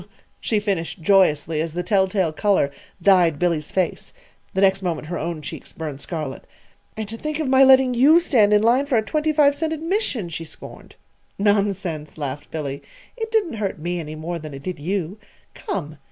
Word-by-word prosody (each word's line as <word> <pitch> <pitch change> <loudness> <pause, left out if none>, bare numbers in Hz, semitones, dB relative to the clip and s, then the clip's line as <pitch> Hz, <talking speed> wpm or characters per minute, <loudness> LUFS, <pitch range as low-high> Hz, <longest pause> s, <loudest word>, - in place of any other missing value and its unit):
_" - - -15 0.3
she 215 - 0
finished 195 -4 -2
joyously, 160 -5 +3
as 160 -1 -3
the 175 +1 -2
telltale 190 -3 +1
color 195 -6 +2 0.3
dyed 180 -6 +4
Billy's 165 -2 0
face. 185 -2 -2 0.4
The 190 - +1
next 195 0 +4
moment 165 -4 -3
her 175 - -3
own 165 -1 -4
cheeks - - -8
burned 150 -3 -6
scarlet. 155 -6 -5 0.5
"And 220 -1 -4
to 225 - -6
think 305 +4 -3
of 310 -3 -2
my 265 +1 +6
letting 265 -1 +6
you 285 +7 +6
stand 235 -12 +3
in 210 0 +4
line 250 +5 +3
for 265 -4 +2
a 220 - +2
twenty 305 +7 0
five 290 -2 +4
cent 320 +2 -2
admission!" 320 - -1
she 165 0 -5
scorned. 160 - -11 0.4
"Nonsense!" 195 -7 0
laughed 145 -1 -5
Billy. 140 -3 -4 0.3
"It 450 -2 -4
didn't 405 - 0
hurt 195 -2 -2
me 175 +3 -3
any 155 -1 -6
more 165 +2 -5
than 150 -2 -8
it 135 - -10
did 180 -2 -5
you. 185 +4 -3 0.3
Come!" 155 - -5
190 Hz, 190 wpm, -22 LUFS, 160-240 Hz, 0.5 s, my